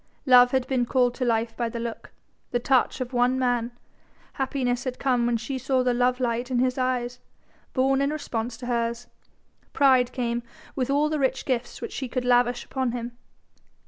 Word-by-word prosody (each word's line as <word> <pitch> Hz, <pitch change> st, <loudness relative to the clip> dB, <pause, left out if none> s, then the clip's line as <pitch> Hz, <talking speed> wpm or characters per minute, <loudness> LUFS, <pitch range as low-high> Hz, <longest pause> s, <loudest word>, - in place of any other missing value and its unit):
Love 250 Hz, -2 st, +7 dB
had 260 Hz, 0 st, 0 dB
been 260 Hz, -2 st, 0 dB
called 245 Hz, 0 st, +2 dB
to 255 Hz, -, -4 dB
life 230 Hz, -1 st, 0 dB
by 235 Hz, -1 st, -1 dB
the 235 Hz, -, -5 dB
look, 230 Hz, -1 st, -6 dB, 0.4 s
the 245 Hz, -, 0 dB
touch 255 Hz, +1 st, +1 dB
of 255 Hz, +1 st, -4 dB
one 245 Hz, +1 st, +2 dB
man, 245 Hz, -2 st, 0 dB, 0.6 s
happiness 255 Hz, -2 st, -1 dB
had 255 Hz, -1 st, -4 dB
come 250 Hz, -3 st, +1 dB
when 240 Hz, -1 st, +1 dB
she 260 Hz, +4 st, -4 dB
saw 260 Hz, 0 st, +1 dB
the 250 Hz, -1 st, +2 dB
love 250 Hz, +1 st, +1 dB
light 240 Hz, 0 st, -1 dB
in 255 Hz, -, 0 dB
his 255 Hz, 0 st, +2 dB
eyes, 250 Hz, -1 st, -1 dB, 0.5 s
born 270 Hz, +1 st, +2 dB
in 280 Hz, -, +2 dB
response 240 Hz, -6 st, -4 dB
to 250 Hz, -, -8 dB
hers: 235 Hz, 0 st, -1 dB, 0.7 s
pride 260 Hz, -3 st, +4 dB
came 240 Hz, -2 st, -2 dB, 0.3 s
with 255 Hz, -2 st, -1 dB
all 290 Hz, +2 st, +3 dB
the 305 Hz, 0 st, -1 dB
rich 265 Hz, -1 st, 0 dB
gifts 250 Hz, -2 st, -2 dB
which -, -, -5 dB
she 265 Hz, -, -4 dB
could 250 Hz, 0 st, -3 dB
lavish 245 Hz, 0 st, +2 dB
upon 260 Hz, -3 st, -2 dB
him. 240 Hz, 0 st, -5 dB
250 Hz, 190 wpm, -25 LUFS, 240-260 Hz, 0.7 s, Love